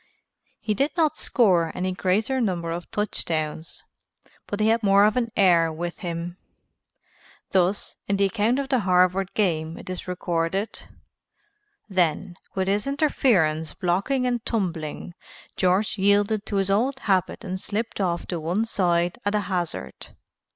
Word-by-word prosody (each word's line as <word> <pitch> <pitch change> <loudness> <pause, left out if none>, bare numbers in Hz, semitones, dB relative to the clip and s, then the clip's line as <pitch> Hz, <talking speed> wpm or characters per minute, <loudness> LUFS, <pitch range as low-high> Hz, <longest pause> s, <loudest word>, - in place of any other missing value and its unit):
He 215 - -1
did 275 +8 +1
not 310 -2 +3
score 185 - +2
any 185 +1 -1
greater 210 +8 0
number 175 -6 -1
of 170 +1 -5
touchdowns, 160 -6 -3 0.6
but 205 - -4
he 215 +1 +3
had 225 +1 +3
more 200 -1 +5
of 215 - +2
an 235 -2 0
air 170 -5 +4
with 170 +2 -5
him. 175 -1 -5 1.1
Thus, 190 +1 +1
in 200 - +1
the 200 - +3
account 220 +4 +1
of 275 -1 -2
the 260 - +3
Harvard 185 0 +2
game 165 -6 0
it - - -8
is 185 - -6
recorded: 180 +2 -2 1.0
"Then, 175 -3 0 0.2
with 190 -1 0
his 205 +5 0
interference 200 - +1
blocked 180 +5 0
and 250 -3 0
tumbling, 175 -6 -3 0.4
George 190 +3 +1
yielded 205 +2 +2
to 205 - -3
his 195 0 +1
old 260 +7 +1
habit 190 -3 0
and 185 0 -4
slipped 220 0 -3
off 175 -2 -1
to 175 - -2
one 175 +8 0
side 175 -5 0
at 205 +1 0
a 210 - +2
hazard. 175 - -4
190 Hz, 150 wpm, -24 LUFS, 175-215 Hz, 1.1 s, more